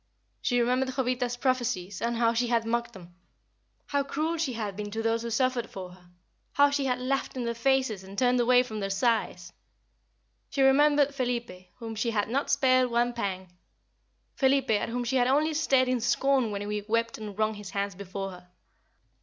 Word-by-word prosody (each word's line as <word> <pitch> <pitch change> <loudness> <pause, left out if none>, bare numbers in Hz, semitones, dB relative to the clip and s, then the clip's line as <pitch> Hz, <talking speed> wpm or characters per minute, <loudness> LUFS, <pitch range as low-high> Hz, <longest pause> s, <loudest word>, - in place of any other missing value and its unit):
She 245 -2 +1
remembered 255 +2 +1
Jovita's 250 -2 -1
prophecies, 240 -8 -1
and 235 0 -1
how 230 0 +3
she 240 +1 0
had 230 -1 +1
mocked 235 +1 -1
them; 175 -3 -13 0.7
how 285 -1 0
cruel 310 +4 -2
she 310 -6 -1
had 210 -4 -4
been 205 0 -5
to 225 +2 -4
those 225 0 +1
who 235 - -4
suffered 250 0 0
for 185 -2 -8
her; 180 -1 -18 0.4
how 285 0 +5
she 285 -1 0
had 250 -1 0
laughed 265 +2 -2
in 250 - -2
their 235 - -1
faces 245 -4 0
and 195 +1 -11
turned 250 +1 +3
away 245 +1 +5
from 220 -4 -6
their 195 -1 -2
sighs. 195 -4 -1 1.0
She 275 - +1
remembered 285 +1 +4
Felipe, 235 -8 -4
whom 230 -2 -6
she 225 +2 -1
had 210 -2 -1
not 275 +4 -1
spared 255 -2 +3
one 240 +1 +1
pang 190 -5 -4 0.8
Felipe, 270 -2 +2
at 210 0 +1
whom 245 +1 -2
she 250 +2 0
had 245 -1 +3
only 300 +4 +2
stared 270 -4 +2
in 250 -2 0
scorn 265 0 +2
when 205 0 -4
he 210 0 -2
wept 230 +1 0
and 210 -2 -7
wrung 215 0 +1
his 205 -2 -9
hands 200 0 -2
before 195 +1 -6
her. 180 0 -13
235 Hz, 195 wpm, -28 LUFS, 210-260 Hz, 1.0 s, how